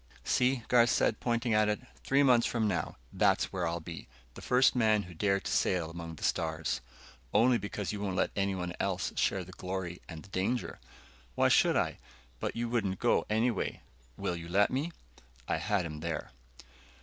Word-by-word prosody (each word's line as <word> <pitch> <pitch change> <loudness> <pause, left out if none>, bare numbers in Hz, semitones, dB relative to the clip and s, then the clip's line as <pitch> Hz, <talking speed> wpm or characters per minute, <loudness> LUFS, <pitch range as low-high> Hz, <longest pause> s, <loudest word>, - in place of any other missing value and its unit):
"See," 125 - +2
Garth 120 -1 +5
said, 105 +2 +2
pointing 120 -1 0
at 105 0 +4
it. 105 - 0 0.2
"Three 140 +1 +3
months 125 -3 +5
from 115 -2 0
now, 90 -4 -2 0.2
that's - - +2
where 90 -3 -1
I'll 85 +1 -2
be. 80 0 -8 0.3
The - - -10
first 125 +2 +4
man 110 -4 +3
who 90 - -11
dared 100 +3 +1
to - - -3
sail 85 -3 +1
among 85 -1 -7
the - - -11
stars." 80 -1 -1 0.5
"Only 120 0 +5
because 100 -2 -4
you 105 - -4
don't 100 -2 -2
let - - +1
anyone 95 -3 -1
else 95 -2 -1
share 95 - +1
the 90 - -12
glory 90 -1 -5
and 80 -2 -8
the - - -16
danger." 95 +7 -2 0.6
"Why - - +4
should - - +4
I? - - 0 0.4
But - - -3
you 120 +1 -1
wouldn't 105 -6 0
go, - - +2
anyway." 110 0 0 0.4
"Will 90 - -2
you 85 0 -7
let 100 +3 +3
me?" 145 +6 -1 0.6
I - - +1
had 100 -4 0
him 75 -2 -6
there. 85 +1 -4
100 Hz, 185 wpm, -31 LUFS, 90-115 Hz, 0.6 s, Garth